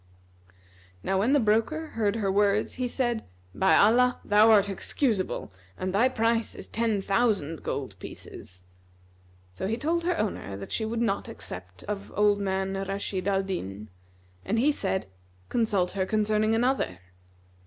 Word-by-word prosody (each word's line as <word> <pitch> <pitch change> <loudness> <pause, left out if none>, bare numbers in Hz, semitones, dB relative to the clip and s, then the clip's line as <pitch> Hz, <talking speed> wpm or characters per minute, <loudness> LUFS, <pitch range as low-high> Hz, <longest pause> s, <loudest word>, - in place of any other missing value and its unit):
'" 95 0 -29
Now 190 - +1
when 230 +8 +2
the 290 - +5
broker 230 +8 +1
heard 215 -2 0
her 200 -4 0
words 205 +1 +2
he 250 - +1
said, 240 -2 -1 0.3
"By 190 - +4
Allah, 250 +4 +4
thou 210 +2 +5
art 205 -2 +6
excusable, 195 - -2 0.2
and 185 0 -3
thy 235 +6 +4
price 230 -2 0
is - - -9
ten 220 -3 0
thousand 195 -8 +1
gold 115 -10 -4
pieces!" 90 0 -11 0.9
So 190 - -4
he 225 +3 -1
told 335 +5 0
her 350 0 0
owner 100 - -3
that 100 - -8
she 220 - 0
would 230 +1 -1
not 200 -4 -1
accept 90 0 -8
of 205 -1 -5
old 205 -1 +3
man 190 -1 -1
Rashid 195 -1 -3
al 195 -1 +2
Din, 105 - -5 0.5
and 220 - -1
he 275 +6 +4
said, 190 -8 -1 0.4
"Consult 210 -6 +1
her 190 -1 -1
concerning 215 +1 +2
another." 240 - +1
205 Hz, 155 wpm, -27 LUFS, 190-230 Hz, 0.9 s, art